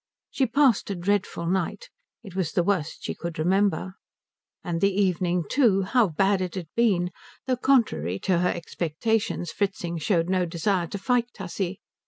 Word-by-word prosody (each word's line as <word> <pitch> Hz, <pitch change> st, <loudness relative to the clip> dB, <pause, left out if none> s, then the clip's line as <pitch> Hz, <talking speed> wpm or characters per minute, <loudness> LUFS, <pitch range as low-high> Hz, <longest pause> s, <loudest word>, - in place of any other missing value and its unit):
She 265 Hz, -, +1 dB
passed 255 Hz, -3 st, +3 dB
a 200 Hz, -, -2 dB
dreadful 185 Hz, -1 st, -1 dB
night. 190 Hz, -, -2 dB, 0.3 s
It 195 Hz, -5 st, -11 dB
was 180 Hz, -5 st, -1 dB
the 175 Hz, -, +2 dB
worst 180 Hz, -5 st, -1 dB
she -, -, -3 dB
could 170 Hz, -1 st, -6 dB
remember. 185 Hz, +2 st, +1 dB, 0.7 s
And 170 Hz, -2 st, -2 dB
the 200 Hz, -, +5 dB
evening 180 Hz, -2 st, +1 dB
too 220 Hz, -9 st, +3 dB
how 230 Hz, +3 st, +3 dB
bad 195 Hz, +4 st, +1 dB
it 180 Hz, -1 st, -3 dB
had 175 Hz, -5 st, -5 dB
been; 190 Hz, -7 st, +2 dB, 0.3 s
though 255 Hz, -2 st, 0 dB
contrary 220 Hz, -, +2 dB
to 180 Hz, -3 st, +2 dB
her 180 Hz, +1 st, +2 dB
expectations 175 Hz, +3 st, -2 dB
Fritzing 180 Hz, -4 st, -2 dB
showed 165 Hz, +1 st, +1 dB
no 185 Hz, -1 st, +1 dB
desire 170 Hz, +1 st, 0 dB
to 200 Hz, -, -5 dB
fight 240 Hz, +4 st, +1 dB
Tussie. 190 Hz, 0 st, -4 dB
185 Hz, 165 wpm, -25 LUFS, 170-205 Hz, 0.7 s, the